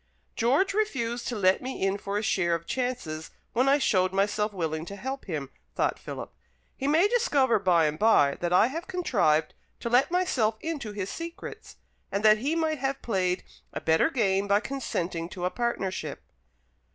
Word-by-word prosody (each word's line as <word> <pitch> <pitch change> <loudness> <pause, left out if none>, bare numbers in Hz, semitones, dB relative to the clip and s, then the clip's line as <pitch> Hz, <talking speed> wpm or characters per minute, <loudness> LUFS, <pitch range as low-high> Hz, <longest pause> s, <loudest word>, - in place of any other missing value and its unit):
"George 275 - +2
refused 245 - -1
to 245 - -2
let 190 -2 +3
me 260 +1 -5
in 195 0 +2
for 200 0 -3
a 210 - -1
share 175 -5 +1
of 170 0 -6
chances 245 -13 -3 0.2
when 255 +3 +3
I 280 - +5
showed 185 -9 +2
myself 205 +2 +1
willing 160 -5 -3
to 200 - -6
help 265 +6 -5
him," 145 -7 -4 0.2
thought - - 0
Philip. - - -7 0.4
"He 275 - -3
may 320 +7 +4
discover 290 - +2
by 175 -4 +3
and 155 +1 -1
by 175 -10 +5
that 175 0 -1
I 180 +4 +6
have 320 +8 -4
contrived 160 - +1 0.3
to 235 - -3
let 250 +3 +4
myself 270 -12 +1
into 290 -8 -4
his 200 -2 -4
secrets; 340 +6 -8 0.4
and 200 +2 -1
that 215 0 +7
he 285 +7 0
might 315 -2 0
have 270 +1 -2
played 185 -5 0 0.3
a - - -3
better 160 - +3
game 200 -8 +1
by 200 +1 +4
consenting 175 -10 -3
to 180 -1 -5
a 180 - 0
partnership." 235 -6 -3
215 Hz, 180 wpm, -27 LUFS, 185-275 Hz, 0.4 s, that